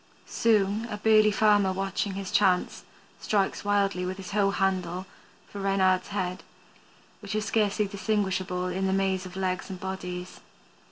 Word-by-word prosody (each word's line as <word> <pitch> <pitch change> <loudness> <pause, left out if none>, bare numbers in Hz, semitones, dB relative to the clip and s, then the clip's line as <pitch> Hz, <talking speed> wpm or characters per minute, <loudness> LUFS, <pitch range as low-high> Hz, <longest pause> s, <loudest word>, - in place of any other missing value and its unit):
Soon 215 -1 +1
a 210 - -4
burly 215 0 +5
farmer 205 -2 +3
watching 195 +1 -2
his 195 -1 -5
chance 185 -3 +2 0.4
strikes 200 -2 0
wildly 200 -2 +1
with 185 +1 -3
his 195 +1 -8
hoe 200 -1 +2
handle 185 -2 -1 0.4
for 200 - -8
Reynard's 190 -1 +2
head, 185 -2 -3 0.8
which 205 0 -5
is 215 0 -1
scarcely 210 -1 +1
distinguishable 190 -3 -1
in 185 +1 -1
the 190 - +1
maze 190 -1 0
of 180 - -12
legs 185 0 -2
and 185 -1 -6
bodies. 180 -1 -6
195 Hz, 150 wpm, -27 LUFS, 185-205 Hz, 0.8 s, burly